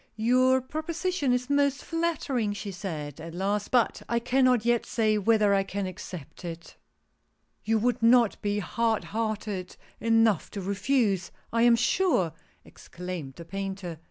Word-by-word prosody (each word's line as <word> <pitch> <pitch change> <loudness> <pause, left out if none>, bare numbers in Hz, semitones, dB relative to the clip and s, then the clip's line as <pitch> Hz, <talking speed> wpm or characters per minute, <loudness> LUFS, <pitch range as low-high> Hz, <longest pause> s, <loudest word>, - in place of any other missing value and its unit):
"Your 255 +3 +3
proposition 315 +2 -2
is 250 0 0
most 285 -1 +1
flattering," 305 -10 -1
she 205 0 -6
said, 160 -5 -6
at 165 +1 -8
last, 200 +3 -1
"but 245 -3 +2
I 235 - +1
cannot 250 -1 +2
yet 240 -1 +2
say 215 -2 +1
whether 210 -1 +3
I 195 - +3
can 195 0 -3
accept 180 -3 -8
it 170 -1 -8 0.3
" - - -47
" - - -47
You 225 +1 +2
would 235 +1 0
not 235 -1 +4
be 205 0 -1
hard 225 +2 0
hearted 210 -4 -3 0.2
enough 225 -4 +3
to - - -2
refuse, 200 -1 0 0.2
I 230 - +2
am 235 0 +6
sure," 230 - +2 0.3
exclaimed 175 -6 -8
the 170 - -10
Painter. 195 -3 -5
215 Hz, 155 wpm, -27 LUFS, 190-245 Hz, 0.3 s, am